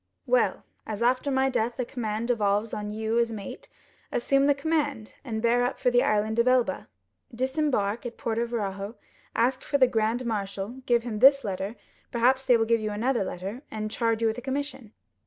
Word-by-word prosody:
"'Well, - - +2 0.2
as 215 +1 -3
after 255 +3 +2
my 265 0 +2
death 235 0 0
the 250 - -1
command 230 -1 -3
devolves 210 -2 +1
on 210 0 -3
you 220 +2 -1
as 235 -1 +1
mate, 220 - -8 0.4
assume 275 +3 +2
the 285 - +4
command, 285 -6 -1
and 225 -4 -4
bear 240 +1 +3
up 245 - -1
for 250 - +2
the 245 0 +4
Island 215 +1 +1
of 235 - +3
Elba, 250 -6 +2 0.4
disembark 255 -4 0
at 235 - -9
Porto 230 +1 -1
Ferrajo, 205 -2 -4 0.4
ask 255 +3 +2
for 285 - 0
the 260 - +6
grand 235 0 0
marshal, 200 -3 -3 0.2
give 235 -1 +3
him 225 -3 -4
this 275 +2 +7
letter—perhaps 230 +6 -1
they 245 - +5
will 225 - +1
give 230 0 +2
you 215 - -2
another 230 +2 0
letter, 195 +6 -5
and 215 -1 -4
charge 230 -1 0
you - - +4
with 220 +2 -1
a - - -9
commission. 265 -3 -4
235 Hz, 190 wpm, -27 LUFS, 215-255 Hz, 0.4 s, this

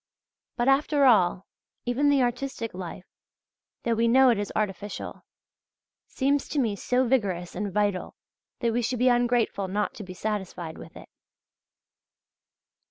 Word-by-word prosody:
But, 240 0 +1
after 280 +1 +3
all, 190 -6 +4 0.4
even 260 +4 +2
the 280 -2 +4
artistic 245 -1 -3
life, 180 0 -7 0.8
though 235 - +1
we 230 +1 +2
know 260 +2 +6
it 225 - 0
is 205 - -3
artificial, 205 -1 -4 0.8
seems 280 +1 0
to - - -4
me 225 -6 +1
so 250 +6 +1
vigorous 195 -9 0
and 200 +2 -3
vital, 205 -1 -1 0.5
that 235 -2 +1
we 240 - +1
should 245 +2 -1
be 250 +2 +4
ungrateful 240 -5 +1
not 205 +2 -1
to 215 - -8
be 185 -1 -9
satisfied 185 -5 -4
with - - -11
it. - - -12
230 Hz, 145 wpm, -26 LUFS, 200-250 Hz, 0.8 s, know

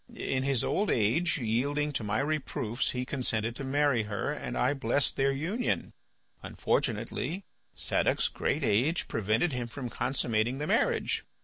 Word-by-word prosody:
In 130 - -1
his 135 -3 +1
old 205 +1 +1
age, 125 +11 +2
yielding 140 +5 0
to 120 - -2
my 105 +4 0
reproofs, 135 -5 -1
he 125 0 -2
consented 115 -4 -1
to 140 - -6
marry 140 -2 +2
her, 105 -2 -2
and - - -5
I - - +3
blessed 135 0 +1
their 135 0 +2
union. 170 - -1 0.5
Unfortunately 190 +4 -1 0.3
Sadoc's - - +2
great - - -1
age 130 +12 +2
prevented 110 - +1
him 125 -1 -2
from 125 0 -6
consummating 120 -1 0
the 150 - -2
marriage. - - +1
130 Hz, 145 wpm, -30 LUFS, 115-145 Hz, 0.5 s, I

